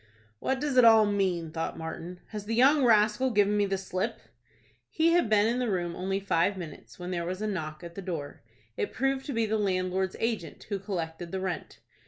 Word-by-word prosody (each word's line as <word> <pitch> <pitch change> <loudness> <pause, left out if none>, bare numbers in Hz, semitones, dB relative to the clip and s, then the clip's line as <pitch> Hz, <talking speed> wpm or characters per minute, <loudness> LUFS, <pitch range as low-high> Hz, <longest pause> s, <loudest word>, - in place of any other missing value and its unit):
"What 265 - -1
does 285 -2 -1
it 250 - +8
all 225 -2 +8
mean?" 185 -5 0
thought 165 0 -3
Martin. 170 +2 -7
"Has 210 -2 -6
the 225 - -1
young 275 +4 +5
rascal 220 +2 +4
given 205 -2 +3
me 205 -1 +2
the 195 0 0
slip?" 185 -1 -3 0.7
He 330 +1 +2
had 345 -9 +3
been 210 -1 +4
in 235 +3 +1
the 250 -2 0
room 175 -3 -1
only 195 +1 -1
five 195 0 +1
minutes, 165 -5 -9
when 180 0 -6
there 170 -1 -1
was 180 +2 -4
a 215 - -2
knock 160 -6 -4
at 170 0 -8
the 195 - -6
door. 165 -6 -5 0.3
It - - -3
proved 270 +1 0
to 285 - -3
be 230 -1 +1
the 220 0 0
landlord's 185 -1 0
agent, 225 -7 -2
who 200 -2 -1
collected 170 -3 -4
the 190 - -2
rent. 185 -3 -5
195 Hz, 215 wpm, -28 LUFS, 180-225 Hz, 0.7 s, it